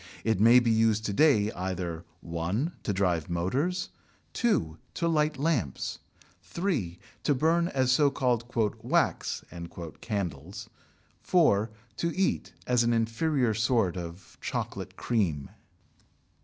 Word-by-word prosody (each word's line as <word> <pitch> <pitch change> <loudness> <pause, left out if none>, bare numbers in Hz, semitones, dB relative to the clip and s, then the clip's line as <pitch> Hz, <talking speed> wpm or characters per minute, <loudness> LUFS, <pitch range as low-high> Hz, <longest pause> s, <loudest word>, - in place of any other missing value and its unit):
It 110 -4 +1
may 115 +4 +7
be 120 -2 +1
used 110 -1 +2
to 105 - -1
day 110 -6 +4
either 90 -3 -4 0.2
(1) 90 - -2
to - - -2
drive 90 -5 0
motors, 130 - -1 0.4
(2) 80 - 0 0.2
to 170 - 0
light 155 -2 +1
lamps, 135 - -1 0.4
(3) 145 - -2 0.2
to 145 - +2
burn 165 +5 +2
as 130 -6 +1
so 145 +2 +5
called 125 -4 0 0.4
"wax" - - 0 0.6
candles, 100 - -4 0.5
(4) 115 - +3 0.3
to 170 +1 -2
eat 190 - 0
(as 125 -1 +3
an 120 0 +2
inferior 115 +2 +1
sort 115 -4 +1
of 85 0 -8
chocolate - - -4
cream). 85 - -1
115 Hz, 120 wpm, -28 LUFS, 90-145 Hz, 0.6 s, may